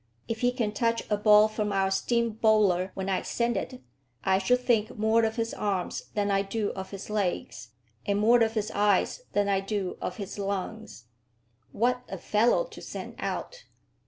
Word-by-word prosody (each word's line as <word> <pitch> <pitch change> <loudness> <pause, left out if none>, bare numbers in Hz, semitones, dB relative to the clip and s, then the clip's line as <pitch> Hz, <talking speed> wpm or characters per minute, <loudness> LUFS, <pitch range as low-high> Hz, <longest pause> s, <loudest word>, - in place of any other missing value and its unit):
If 230 -1 -4
he 245 0 +3
can 235 -4 -1
touch 230 +2 0
a - - +4
ball 210 0 +6
from 215 -1 -2
our 195 -1 +1
steam 235 +4 +1
bowler 210 -4 +3
when 190 0 -4
I 190 -1 0
send 235 0 -1
it, 250 +6 -5 0.4
I 190 0 +3
shall 250 +6 +3
think 240 -4 0
more 220 +2 +3
of 220 0 -2
his 230 -1 -2
arms 195 -4 -2
than 205 -1 +1
I 195 0 +3
do 205 +1 -2
of 190 0 -7
his 195 +1 -8
legs, 175 - -2 0.3
and 200 0 0
more 230 +3 +5
of 225 -1 +2
his 215 -1 -1
eyes 205 - +2
than 205 0 +2
I 195 -1 +2
do 195 -1 -3
of 180 - -3
his 205 -1 -7
lungs. 200 - -4 0.7
What 250 +3 +1
a 195 - -5
fellow 225 - +2
to - - -12
send - - -7
out! - - -5
210 Hz, 190 wpm, -28 LUFS, 195-230 Hz, 0.7 s, ball